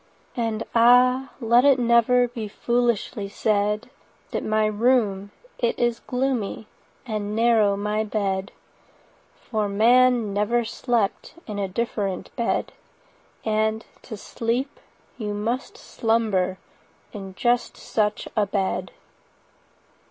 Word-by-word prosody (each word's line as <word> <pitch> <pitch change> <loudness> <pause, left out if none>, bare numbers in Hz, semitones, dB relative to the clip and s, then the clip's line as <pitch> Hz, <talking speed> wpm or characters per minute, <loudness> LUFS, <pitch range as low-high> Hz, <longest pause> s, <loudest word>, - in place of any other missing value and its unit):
And 225 -3 -1
ah! 250 +3 +5
let 235 0 +4
it 275 -2 +5
never 245 +1 +4
45 240 - -22
Be 225 -3 -4
foolishly 235 -2 -1
said 210 +1 0 0.4
That - - -2
my 215 0 +1
room 215 -3 +1 0.3
it 235 - 0
is 240 -1 0
gloomy, 250 -5 -2 0.4
And 210 -3 -3
narrow 220 -3 +3
my 210 +1 -1
bed; 195 -3 -2 0.9
For 215 -3 -1
man 235 +1 +4
never 225 +4 +1
slept 230 0 -1
In 210 -2 -5
a 195 - -1
different 200 -2 -3
bed— 235 - -1 0.7
50 - - -2
And, 220 +1 0 0.2
to 220 - -8
sleep, 240 - -3 0.4
you 210 -2 -3
must 245 - -3
slumber 215 - 0 0.6
In 195 -3 -8
just 240 +3 0
such 210 -1 -1
a 210 -2 +2
bed. 195 -1 -2
220 Hz, 115 wpm, -24 LUFS, 205-240 Hz, 0.9 s, ah